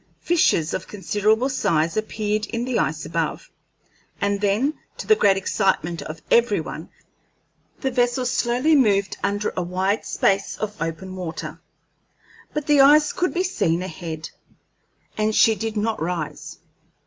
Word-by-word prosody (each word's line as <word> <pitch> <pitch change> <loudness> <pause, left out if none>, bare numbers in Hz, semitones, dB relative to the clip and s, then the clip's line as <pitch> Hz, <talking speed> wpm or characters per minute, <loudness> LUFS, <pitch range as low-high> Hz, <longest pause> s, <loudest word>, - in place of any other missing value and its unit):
Fissures 240 - +2
of - - -4
considerable 210 +4 +1
size 165 - 0
appeared 215 0 -2
in 235 +1 -3
the 255 -2 0
ice 155 0 -1
above, 160 0 -3 0.7
and 200 0 0
then, 210 +9 +1 0.2
to - - -6
the 435 - +5
great 195 - +3
excitement 190 -4 0
of 155 0 -8
every 235 -5 +4
one, 160 +1 -7 0.9
the 265 - 0
vessel 245 0 +1
slowly 250 +5 +2
moved 200 -7 +2
under 205 +1 -1
a 185 - -1
wide 185 +4 -1
space 195 0 0
of 210 -1 -4
open 175 +3 -4
water; 180 -3 -6 0.9
but 300 -1 -3
the 295 -2 +5
ice 295 +2 +6
could 360 0 0
be 360 - 0
seen 180 - 0
ahead, 160 -3 -6 0.9
and 215 0 +1
she 225 - +6
did 220 0 -4
not 220 -1 -1
rise. 165 -2 -4
205 Hz, 145 wpm, -23 LUFS, 175-245 Hz, 0.9 s, ice